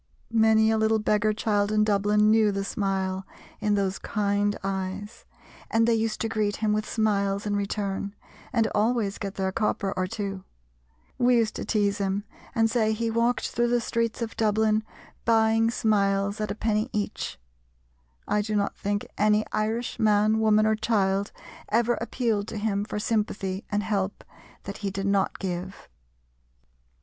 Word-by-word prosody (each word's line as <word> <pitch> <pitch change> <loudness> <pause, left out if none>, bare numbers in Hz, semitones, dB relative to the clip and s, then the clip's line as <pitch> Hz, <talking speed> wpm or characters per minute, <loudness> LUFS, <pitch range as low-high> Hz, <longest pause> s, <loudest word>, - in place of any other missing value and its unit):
Many 220 0 +4
a 220 - +2
little 220 0 +3
beggar 215 0 +2
child 210 -1 0
in 215 0 +3
Dublin 210 0 +3
knew 220 -1 +4
the 195 0 -2
smile 190 -1 -2 0.4
in 210 -1 +1
those 195 -1 -1
kind 205 0 0
eyes, 195 +2 -4 0.4
and 225 +1 +3
they 235 - +4
used 225 -1 0
to 225 - 0
greet 215 -2 0
him 215 -1 0
with 215 0 -1
smiles 200 -2 0
in 205 -1 0
return 200 0 -2 0.4
and 230 -3 +2
always 215 -2 +1
get 200 -1 -5
their 190 -1 -1
copper 200 -1 -1
or 185 0 -1
two. 195 -1 -4 0.8
We 245 0 +4
used 225 -2 +1
to - - -4
tease 205 -1 +1
him, 195 +1 -1 0.3
and 225 -1 +4
say 220 -1 +1
he 230 +1 -1
walked 235 +2 +1
through 240 0 +1
the 240 0 +2
streets 230 0 -1
of 225 - -6
Dublin 215 0 +2 0.4
"buying 225 0 +3
smiles 200 -2 +1
at 210 - -2
a 200 - -3
penny 220 +2 0
each." 210 -2 -3 0.9
I 210 - +2
do 210 +1 -2
not 200 -1 0
think 205 0 -2
any 210 +1 +3
Irish 225 +3 -2
man, 215 0 +3
woman, 215 -1 +4
or 220 0 +3
child 200 -2 0 0.4
ever 235 +2 +2
appealed 220 -5 -1
to 220 - -5
him 205 -1 -1
for 210 - -5
sympathy 210 -3 -1
and 205 0 0
help 205 -2 -2 0.4
that 200 - -6
he 200 - -3
did 195 0 -4
not 200 -1 +1
give. 185 0 -5
210 Hz, 165 wpm, -26 LUFS, 200-220 Hz, 0.9 s, Many